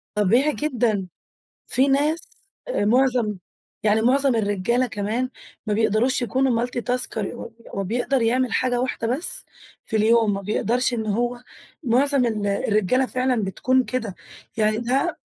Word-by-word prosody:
طبيعي 235 +9 +3
جدًا. 235 -10 0 0.6
في 265 +3 +2
ناس 295 +4 0 0.3
آآ 350 - 0
معظم 240 -3 +2 0.4
يعني 215 +1 +2
معظم 270 +2 +3
الرجالة 215 +4 0
كمان 220 +3 -2 0.4
ما 210 - 0
بيقدروش 225 +4 +1
يكونوا 245 -1 +1
Multi 245 0 -4
Tasker، 250 -2 0
ه 230 +2 -5 0.2
هو 195 - -2
بيقدر 245 +5 0
يعمل 245 +2 +1
حاجة 250 -1 +1
واحدة 250 -2 -2
بس 330 - +2 0.4
في 220 - -2
اليوم، 220 0 +3
ما 195 - -3
بيقدرش 240 +5 0
إن 220 -2 -3
هو 240 +3 -1 0.4
معظم 260 +1 +3
ال 210 -3 -2
الرجالة 210 +5 +1
فعلًا 255 -3 0
بتكون 255 +7 +1
كده، 230 -7 -3 0.4
يعني 215 0 +2
ده 265 +9 0
240 Hz, 140 wpm, -23 LUFS, 215-255 Hz, 0.6 s, طبيعي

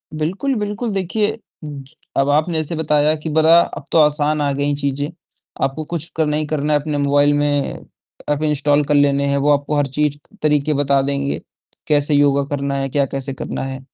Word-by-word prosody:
बिल्कुल, 190 - -1
बिल्कुल, 210 +2 -3
देखिए, 205 +3 -1 0.3
ज 145 -2 -7 0.3
अब 135 +1 +2
आपने 155 +3 +1
जैसे 155 +1 -1
बताया 150 -1 +2
कि 155 +1 -6
बड़ा 160 +2 +5
अब - - -5
तो - - +3
आसान 150 0 +2
आ 145 -1 +1
गईं 145 +1 0
चीज़ें, 140 0 -2 0.5
आपको 135 +3 -1
कुछ 165 -1 -4
करना 150 -1 +1
ही 155 - -1
करना 150 0 -1
है, 145 - +3
अपने 150 0 -3
मोबाईल 145 0 +3
में 145 -1 0 0.6
एप 150 +1 0
इंस्टॉल 150 -1 +2
कर 145 +1 +1
लेने 140 0 +3
हैं, 140 0 +1
वो 140 +1 +1
आपको 145 +1 -1
हर 145 -1 +1
चीज़ 145 +1 -1 0.3
तरीके 150 0 +2
बता 140 -1 +2
देंगे, 140 0 -1 0.5
कैसे 150 0 +2
योगा 140 -1 +3
करना 140 0 -2
है, 135 0 -2
क्या 140 +1 +1
कैसे 135 0 -5
करना - - -5
है? 135 0 -5
145 Hz, 195 wpm, -19 LUFS, 140-155 Hz, 0.6 s, बड़ा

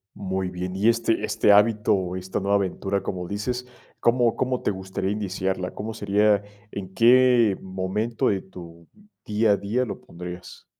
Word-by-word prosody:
Muy 95 -1 -3
bien, 90 0 -5
y 100 +4 +1
este 115 -1 +1
este 105 - +3
hábito 105 +1 +4
o 90 -2 -1
esta 95 +1 -3
nueva 100 +1 +1
aventura 100 0 -1
como 90 -2 -4
dices, 125 +6 -3 0.3
¿cómo 120 -1 +3
cómo 130 -1 -1
te - - +1
gustaría 95 0 -3
iniciarla?, 95 -2 -2
¿cómo 110 +2 -5
sería?, 105 0 +2 0.3
¿en 95 -2 -7
qué 120 -2 +5
momento 95 +5 -1
de 95 -2 0
tu 85 -3 -13 0.4
día 105 +1 +2
a 100 - +3
día 110 +6 -1
lo - - -7
pondrías? 90 +1 -10
100 Hz, 160 wpm, -24 LUFS, 95-110 Hz, 0.4 s, qué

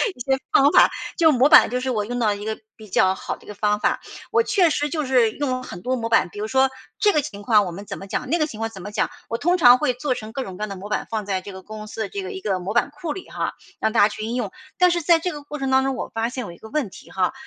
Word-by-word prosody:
一 - - -19
些 265 +2 +1 0.2
方 280 +2 +6
法。 - - +6 0.3
就 320 -3 +6
模 265 +2 +4
板 - - +8
就 250 - 0
是 260 +1 -3
我 210 -4 0
用 245 +2 -3
到 210 -3 +2
一 205 +1 -8
个 220 0 -2 0.2
比 215 -1 -13
较 190 0 +3
好 - - -5
的 - - -20
一 - - -20
个 210 - -8
方 210 0 +1
法。 - - +1 0.3
我 450 0 +4
确 365 -7 +3
实 295 0 0
就 305 -2 -2
是 245 -4 +3
用 285 +1 -3
了 255 0 -2
很 175 -7 -8
多 255 +4 -1
模 230 -2 -3
板， 225 -6 +3
比 205 - -14
如 215 - -2
说 265 +2 +3 0.3
这 415 - +4
个 300 - +3
情 205 -4 -7
况 210 -1 +4
我 175 - -4
们 195 +4 -8
怎 200 - -5
么 195 - -9
讲， 200 - -4
那 340 - +2
个 305 - +2
情 225 -8 -9
况 225 0 -2
怎 190 -4 -11
么 205 - -7
讲， 210 - 0 0.2
我 230 - -2
通 350 +5 +2
常 250 -5 +7
会 290 -5 +1
做 255 +1 -1
成 220 -2 -7
各 265 - -3
种 185 -4 -8
各 - - -10
样 215 - -2
的 195 - -5
模 195 +2 -8
板， 210 - -2
放 215 -3 -3
在 190 -2 -1
这 200 - -9
个 190 0 -10
公 215 +1 -8
司 220 - -6
的 200 - -2
这 200 - -4
个 185 - -6
一 190 - -7
个 195 -3 -1
模 195 +5 -5
板 240 - +3
库 300 +2 -5
里 370 - -7
哈， - - -3 0.3
让 220 - +1
大 230 - +1
家 205 - +7
去 215 - -7
应 230 +2 -3
用。 250 - -2 0.3
但 360 -2 +5
是 345 0 0
在 335 +1 +5
这 360 +2 -2
个 295 - -7
过 295 +1 -7
程 270 -1 -2
当 265 0 +4
中， 270 -1 -1
我 - - -5
发 225 +1 -1
现 255 0 -5
有 175 - -7
一 170 - -13
个 220 - -12
问 290 -8 -1
题 - - -14
哈， 185 +4 0
230 Hz, 360 characters per minute, -23 LUFS, 210-280 Hz, 0.3 s, 板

